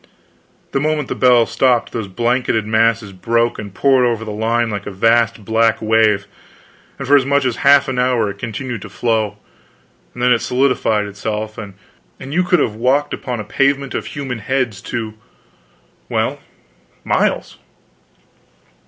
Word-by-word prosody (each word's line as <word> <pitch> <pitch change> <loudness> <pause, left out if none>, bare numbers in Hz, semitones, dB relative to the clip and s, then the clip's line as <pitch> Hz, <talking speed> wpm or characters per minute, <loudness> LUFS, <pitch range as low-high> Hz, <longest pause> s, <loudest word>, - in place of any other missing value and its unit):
The 135 - 0
moment 150 -1 -1
the - - -1
bells 120 -3 +4
stopped, 125 0 +2
those 110 -4 -4
banked 120 +6 -1
masses 110 -1 +1
broke 115 +5 0
and 100 - -7
poured 130 +5 +3
over 115 -2 0
the 110 - -5
line 115 +2 0
like 105 -1 -5
a - - -4
vast 115 +1 +2
black 115 +1 +2
wave, 110 -2 +2 0.7
and 135 - -6
for 145 - +6
as 140 - +5
much 140 +1 +1
as 125 -3 -1
a - - -9
half 140 +1 +5
hour 125 -4 +1
it 100 - -13
continued 120 0 -5
to - - -9
flow, 110 -3 -1 0.8
and 120 - -4
then 125 0 +5
it 120 - +1
solidified 125 -5 +1
itself, 105 +1 -4
and 100 -3 -8 0.4
you 150 +7 -1
could 180 0 +3
have 105 - 0
walked 130 +6 +1
upon 125 -3 -4
a - - -4
pavement 140 +5 0
of - - -4
human 135 -5 -5
heads 120 -4 -2
to 110 -2 -4 1.0
well, - - -1 0.6
miles. - - -1
115 Hz, 160 wpm, -18 LUFS, 110-130 Hz, 1.0 s, for